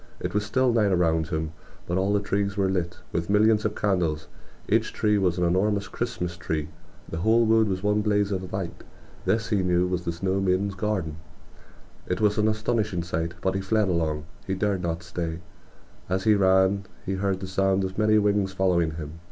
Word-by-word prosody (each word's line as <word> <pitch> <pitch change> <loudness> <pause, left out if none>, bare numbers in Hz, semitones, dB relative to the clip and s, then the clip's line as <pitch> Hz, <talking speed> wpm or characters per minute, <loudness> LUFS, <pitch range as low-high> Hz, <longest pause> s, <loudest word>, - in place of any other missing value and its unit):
It - - -4
was 105 0 +1
still 125 +4 +2
night 105 -4 +3
around 80 -3 +2
him, 80 -1 -2 0.3
but 85 - -2
all 95 +2 +1
the 105 - +3
trees 100 0 -1
were 95 -1 +2
lit 90 -2 -2
with 85 +1 -2
millions 105 +1 +4
of 105 - -1
candles. 85 -6 0 0.4
Each - - +2
tree 105 -1 +1
was 90 -2 +1
an 90 - 0
enormous 100 +3 +1
Christmas 90 -7 -3
tree. 80 -2 -3 0.4
The 80 - -5
whole 110 +5 +4
wood 110 0 +4
was 95 -1 -2
one 105 +1 +2
blaze 105 -1 +1
of 95 -1 -3
light... 95 -3 -5 0.4
this 115 0 +1
he 105 - +2
knew 90 -1 +2
was 90 -1 -2
the 85 - -1
snow 95 +3 -1
maiden's 95 +1 +1
garden! 95 -6 -2 0.9
It 90 - -1
was 105 -1 +2
an 105 - +3
astonishing 110 -4 0
sight; 85 0 -3
but 95 - +1
he 95 - -1
fled 105 +1 +1
along; 80 -3 -1 0.2
he 95 - 0
dared 100 -1 0
not 85 -1 -3
stay. 85 -1 -4 0.7
As 95 +1 0
he 110 - +5
ran 95 0 +3 0.2
he 95 - -1
heard 95 0 -1
the 95 - -5
sound 95 +1 +1
of 95 +2 -4
many 110 0 +4
wings 100 -2 +2
following 85 -4 +1
him. 80 0 -7
95 Hz, 200 wpm, -26 LUFS, 85-105 Hz, 0.9 s, he